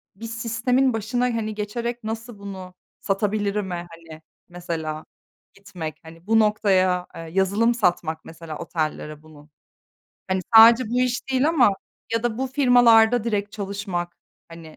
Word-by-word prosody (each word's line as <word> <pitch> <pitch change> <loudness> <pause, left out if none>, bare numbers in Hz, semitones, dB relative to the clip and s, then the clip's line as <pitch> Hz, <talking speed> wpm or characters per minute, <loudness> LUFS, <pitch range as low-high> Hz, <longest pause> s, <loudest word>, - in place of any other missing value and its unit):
bir 195 - -26
m - - -5
sistemin 230 +3 0
başına, 225 +3 -2
hani, 225 -3 -2
geçerek 235 +3 -4
nasıl 225 0 -6
bunu 190 -2 -9 0.3
satabilirim'e, 205 -1 -1
hani, 165 -1 -13 0.3
mesela 165 -3 -5 0.5
gitmek. 175 -6 -8
Hani, 165 +3 -15
bu 225 0 +4
noktaya, 185 -4 +2
eee, - - -7
yazılım 195 +7 +1
satmak 175 -7 -1
mesela 160 -1 -9
otellere 155 -2 -4
bunu. 150 -1 -17 0.8
Hani, 190 0 0 0.2
sadece 230 +1 +8
bu 245 - +1
iş 250 +1 -1
değil 265 +3 +2
ama 260 -10 +4 0.4
ya 230 - 0
da 240 -2 -2
bu 265 - -1
firmalarda 245 -4 +4
direkt 205 -3 -2
çalışmak, 195 -4 -4 0.3
hani, 165 -2 -12
205 Hz, 140 wpm, -23 LUFS, 175-230 Hz, 0.8 s, sadece